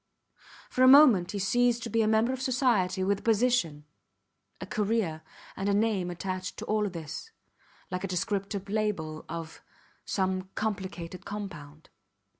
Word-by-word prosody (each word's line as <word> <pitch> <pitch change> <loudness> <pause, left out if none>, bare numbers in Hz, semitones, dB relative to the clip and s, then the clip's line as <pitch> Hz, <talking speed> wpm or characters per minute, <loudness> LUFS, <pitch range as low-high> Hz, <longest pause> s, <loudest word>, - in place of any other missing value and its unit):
For 255 - -1
a 255 - +8
moment 255 -10 +7
he 205 - -4
ceased 240 +4 +2
to 235 - -4
be 230 - +2
a 215 - +2
member 220 +3 +3
of 260 - -5
society 235 -8 +1
with 200 +1 +1
a - - -15
position, 220 -10 +1 0.7
a - - -6
career, 210 -7 -1 0.3
and 195 +1 -2
a 200 - +2
name 205 -4 +1
attached 185 +1 -4
to - - -6
all 210 -1 0
this, 165 - -7 0.6
like 180 +1 -3
a - - -1
descriptive 195 +1 -2
label 195 -7 -2
of 165 -1 -7 0.4
some 185 -1 -1
complicated 190 -4 -4
compound. 165 -8 -8
200 Hz, 150 wpm, -29 LUFS, 180-225 Hz, 0.7 s, a